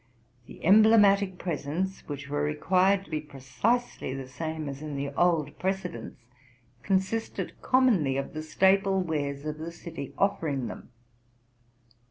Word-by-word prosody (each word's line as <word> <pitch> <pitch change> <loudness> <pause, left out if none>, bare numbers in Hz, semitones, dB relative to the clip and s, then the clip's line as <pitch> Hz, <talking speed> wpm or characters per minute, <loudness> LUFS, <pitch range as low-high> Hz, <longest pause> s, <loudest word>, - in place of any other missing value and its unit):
The - - -10
emblematic 200 -1 +6
presents, 175 +3 -3
which 140 -1 -6
were 145 +1 -2
required 185 +6 +2
to - - -17
be 155 -1 -1
precisely 140 - -2
the 135 -1 -6
same 155 +3 -5
as 140 0 -6
in 150 -2 -5
the 140 0 -2
old 155 -1 +1
precedents, 185 -10 -3 0.6
consisted 195 - -1
commonly 215 - +3
of 140 - -4
the 155 - -4
staple 190 +4 +3
wares 145 -5 -2
of 155 0 -4
the 165 +2 -5
city 170 -5 -8
offering 160 -10 0
them. - - -8
160 Hz, 135 wpm, -28 LUFS, 145-190 Hz, 0.6 s, emblematic